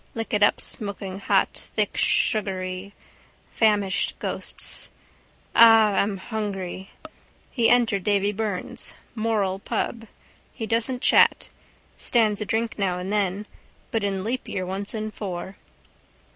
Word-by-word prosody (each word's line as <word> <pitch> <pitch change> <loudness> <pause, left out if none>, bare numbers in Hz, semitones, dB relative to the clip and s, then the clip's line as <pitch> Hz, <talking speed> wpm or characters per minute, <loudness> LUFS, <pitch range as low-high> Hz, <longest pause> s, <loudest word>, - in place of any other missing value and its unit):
Lick 225 -1 -4
it 210 - +2
up 205 - +5
smokinghot, 200 -2 -1
thick - - -3
sugary. 190 -2 0 0.6
Famished 205 -4 +1
ghosts. - - -1 0.7
Ah, 225 -2 +7
I'm 200 -1 -1
hungry. 195 -3 -5 0.6
He 235 -3 +3
entered 225 -6 +3
Davy 200 0 +2
Byrne's. 210 -3 -3 0.2
Moral 215 -4 0
pub. 225 +3 -3 0.5
He 225 - -4
doesn't 230 +3 -1
chat. - - +4 0.5
Stands 220 -3 +1
a - - -1
drink 225 0 -1
now 185 -3 0
and 185 +3 -4
then. 200 0 0 0.5
But 225 -2 0
in 195 -2 -1
leapyear 220 -5 -3
once 195 +4 -4
in 215 0 -3
four. 190 -2 -6
205 Hz, 115 wpm, -24 LUFS, 195-225 Hz, 0.7 s, Ah